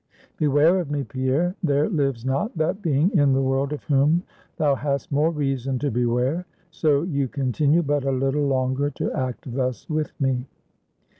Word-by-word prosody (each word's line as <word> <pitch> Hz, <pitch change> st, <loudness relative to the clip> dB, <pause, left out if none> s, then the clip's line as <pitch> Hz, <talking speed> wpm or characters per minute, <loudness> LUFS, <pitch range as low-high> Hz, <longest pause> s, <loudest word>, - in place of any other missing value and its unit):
Beware 155 Hz, +5 st, +4 dB
of 170 Hz, -5 st, -4 dB
me, 145 Hz, -1 st, -1 dB
Pierre. 130 Hz, +8 st, 0 dB
There 145 Hz, -4 st, +2 dB
lives 135 Hz, -, -1 dB
not 180 Hz, -, -1 dB
that 160 Hz, +6 st, 0 dB
being 165 Hz, +4 st, +1 dB
in 145 Hz, -4 st, +4 dB
the 135 Hz, -, +2 dB
world 135 Hz, +1 st, 0 dB
of 150 Hz, -, -5 dB
whom 150 Hz, +4 st, +2 dB, 0.3 s
thou 145 Hz, -2 st, +3 dB
hast 140 Hz, +5 st, -2 dB
more 150 Hz, +3 st, +3 dB
reason 135 Hz, -4 st, -1 dB
to 145 Hz, +2 st, -1 dB
beware, 125 Hz, +8 st, 0 dB, 0.2 s
so 150 Hz, -2 st, +2 dB
you 140 Hz, -6 st, -1 dB
continue 140 Hz, +5 st, +1 dB
but 145 Hz, -1 st, 0 dB
a 135 Hz, -, 0 dB
little 135 Hz, +2 st, 0 dB
longer 130 Hz, +1 st, 0 dB
to 140 Hz, -, -3 dB
act 130 Hz, -1 st, -4 dB
thus 130 Hz, -1 st, -2 dB
with 155 Hz, -1 st, -2 dB
me." 130 Hz, -2 st, 0 dB
140 Hz, 170 wpm, -23 LUFS, 130-155 Hz, 0.3 s, Beware